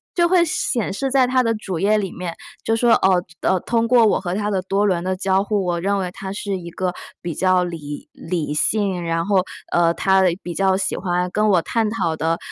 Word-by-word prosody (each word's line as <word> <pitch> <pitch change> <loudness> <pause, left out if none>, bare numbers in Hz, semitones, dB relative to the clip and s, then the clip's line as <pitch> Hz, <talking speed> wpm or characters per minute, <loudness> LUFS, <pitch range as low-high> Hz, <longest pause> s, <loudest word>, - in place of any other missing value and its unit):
就 345 - +3
会 355 -1 +4
显 295 - -1
示 270 +6 -2
在 260 -1 +4
它 255 0 +2
的 230 -1 +1
主 190 -5 -5
页 205 +4 +3
里 195 -3 -3
面， 175 -1 -5 0.3
就 225 - +1
说： 235 0 +4
“哦， 185 -2 +4
就 170 -1 -3
哦， 190 - +2
通 230 +4 0
过 240 -2 +6
我 210 - +2
和 180 -2 -3
他 210 +1 -1
的 195 -3 0
多 195 +2 0
轮 180 -4 +1
的 185 0 -2
交 190 0 +1
互， 205 -2 -1
我 175 -1 -1
认 200 +2 +1
为 185 -2 -2
他 190 +1 -7
是 200 0 -3
一 170 -2 -8
个 180 +1 -2 0.3
比 170 -3 -4
较 185 0 +3
理 150 -4 -7
理 165 -4 -3
性， 190 +3 0
然 165 0 -1
后， 195 -2 +2 0.3
呃， 170 -1 +3
他 190 +2 +3 0.2
比 175 - -5
较 190 +1 +2
喜 190 -1 -1
欢 180 -1 -1
跟 210 +2 +1
我 185 -4 +4
探 225 +4 0
讨 190 -7 -1
的 165 +1 0
190 Hz, 250 characters per minute, -21 LUFS, 175-210 Hz, 0.3 s, 过